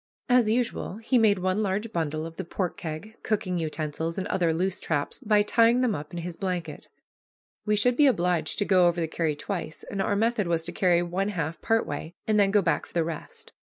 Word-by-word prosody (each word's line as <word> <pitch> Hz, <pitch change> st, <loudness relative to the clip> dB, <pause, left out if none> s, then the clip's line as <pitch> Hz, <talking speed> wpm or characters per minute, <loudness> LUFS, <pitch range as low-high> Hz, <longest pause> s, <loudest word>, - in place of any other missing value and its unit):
As 245 Hz, -3 st, +4 dB
usual 230 Hz, -4 st, -1 dB
he 235 Hz, +3 st, +2 dB
made 210 Hz, -3 st, +4 dB
one 185 Hz, +3 st, 0 dB
large 210 Hz, +2 st, -2 dB
bundle 155 Hz, -2 st, -2 dB
of 165 Hz, 0 st, -9 dB
the 190 Hz, -, -3 dB
pork 180 Hz, +1 st, -3 dB
keg, 190 Hz, +4 st, -7 dB
cooking 185 Hz, -5 st, -1 dB
utensils, 160 Hz, +1 st, -3 dB
and 190 Hz, -, -2 dB
other 175 Hz, -3 st, +2 dB
loose 180 Hz, +3 st, -1 dB
traps, 145 Hz, -3 st, -2 dB
by 210 Hz, -4 st, +3 dB
tying 230 Hz, +3 st, +4 dB
them 250 Hz, -4 st, +2 dB
up 150 Hz, 0 st, -6 dB
in 175 Hz, -, -5 dB
his 175 Hz, 0 st, -5 dB
blanket. 180 Hz, -5 st, -4 dB, 0.8 s
We 210 Hz, -, +3 dB
should 245 Hz, +4 st, +2 dB
be 290 Hz, +2 st, +5 dB
obliged 175 Hz, -, +1 dB
to 205 Hz, -, +1 dB
go 185 Hz, -3 st, +5 dB
over 175 Hz, 0 st, +1 dB
the 165 Hz, -, 0 dB
carry 160 Hz, -1 st, -1 dB
twice, 155 Hz, -1 st, -5 dB
and 195 Hz, -, -4 dB
our 200 Hz, -, +1 dB
method 220 Hz, -2 st, +1 dB
was 165 Hz, -1 st, 0 dB
to 175 Hz, -, -3 dB
carry 175 Hz, -2 st, +2 dB
one 185 Hz, +3 st, -1 dB
half 165 Hz, -5 st, -3 dB
part 225 Hz, 0 st, +2 dB
way, 160 Hz, +4 st, -6 dB
and 215 Hz, -1 st, +2 dB
then 200 Hz, -1 st, +4 dB
go 200 Hz, 0 st, +3 dB
back -, -, 0 dB
for -, -, -17 dB
the 170 Hz, -, +3 dB
rest. 160 Hz, -1 st, -8 dB
185 Hz, 225 wpm, -27 LUFS, 165-210 Hz, 0.8 s, be